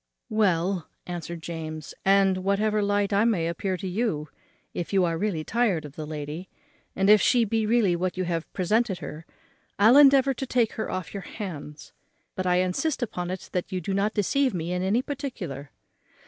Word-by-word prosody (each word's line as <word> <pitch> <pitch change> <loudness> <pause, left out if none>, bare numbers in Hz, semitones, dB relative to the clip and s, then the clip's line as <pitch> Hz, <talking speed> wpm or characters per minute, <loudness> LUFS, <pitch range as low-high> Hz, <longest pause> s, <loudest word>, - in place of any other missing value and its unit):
"Well," 185 -4 +1 0.2
answered 170 -1 -6
James, 155 -2 -6
"and, 195 -1 +4
whatever 205 +3 +1
light 205 0 +1
I 200 +2 +4
may 200 -8 +2
appear 185 +2 -2
to 190 - -5
you 180 -7 -1 0.4
in, - - -2
if 170 - -6
you 190 -2 +3
are 165 -1 0
really 170 -3 -1
tired 205 -6 0
of 145 -1 -10
the 155 -1 -6
lady, 155 +4 -6 0.5
and 195 - +1
if 210 -1 +7
she 240 -2 +4
be 220 0 0
really 215 -6 +3
what 180 +1 -2
you 185 - 0
have 170 -2 -2
represented 205 +2 +1
her, 160 0 -8 0.5
I'll 225 +6 +6
endeavour 275 -1 +6
to 265 +1 -5
take 240 -3 +2
her 220 - -4
off 185 -4 -4
your 200 - -4
hands; 155 -8 -8 0.4
but 185 -1 -3
I 180 - +3
insist 215 - 0
upon 180 -6 -4
it 185 +1 -6
that 180 - -3
you 185 - -1
do 185 +3 -3
not 200 +2 0
deceive 250 +3 +1
me 170 +1 -2
in 180 - -1
any 205 +7 +1
particular." 225 - -5
190 Hz, 190 wpm, -26 LUFS, 170-215 Hz, 0.5 s, if